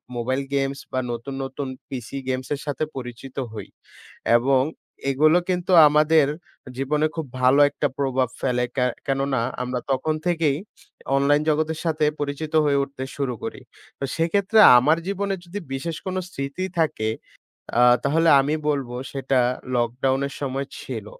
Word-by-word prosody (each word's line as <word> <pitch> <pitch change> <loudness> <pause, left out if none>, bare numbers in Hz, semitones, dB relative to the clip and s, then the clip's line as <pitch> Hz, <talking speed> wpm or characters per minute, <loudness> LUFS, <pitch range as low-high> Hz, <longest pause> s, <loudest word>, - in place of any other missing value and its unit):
Mobile 130 +3 -1
games 135 0 -1
বা 130 - 0
নতুন, 120 +4 -5
নতুন 135 +1 -5 0.2
পিসি 130 0 -6
গেমসের 130 +2 -2
সাথে 145 +1 -2
পরিচিত 125 +1 -8 0.2
হই। 110 - -7 0.7
এবং 130 +2 +3 0.5
এগুলো 155 +5 +4
কিন্তু 180 0 -1 0.2
আমাদের 150 +1 +4 0.5
জীবনে 150 +3 +1
খুব 160 -2 -3 0.2
ভালো 130 +3 +5
একটা 145 +1 -1
প্রভাব 130 -2 0
ফেলে। 125 -2 +1
কে 125 -2 +2 0.2
কেননা 135 -1 0 0.2
আমরা 125 0 -2
তখন 145 +4 0
থেকেই 160 -5 +1 0.6
অনলাইন 145 +2 +3
জগতের 155 +1 0
সাথে 155 -1 +1
পরিচিত 145 +2 -4
হয়ে 140 -1 +3
উঠতে 140 -1 -7
শুরু 135 -3 -1
করি। - - -5 0.4
তো - - -5
সেক্ষেত্রে 200 +6 +2 0.2
আমার 150 +6 +4
জীবনে 200 0 -1
যদি 195 +4 -6
বিশেষ 155 +5 -3
কোন 185 -1 -3
স্মৃতি 140 +4 -4
থাকে 110 -9 +1 0.7
আ - - +6 0.2
তাহলে 160 +4 +3
আমি 145 +3 0
বলব 140 -4 -1 0.2
সেটা 135 -1 0 0.4
লকডাউনের 130 +3 0
সময় 135 0 -2
ছিল। 115 -6 -6
140 Hz, 140 wpm, -23 LUFS, 130-155 Hz, 0.7 s, আ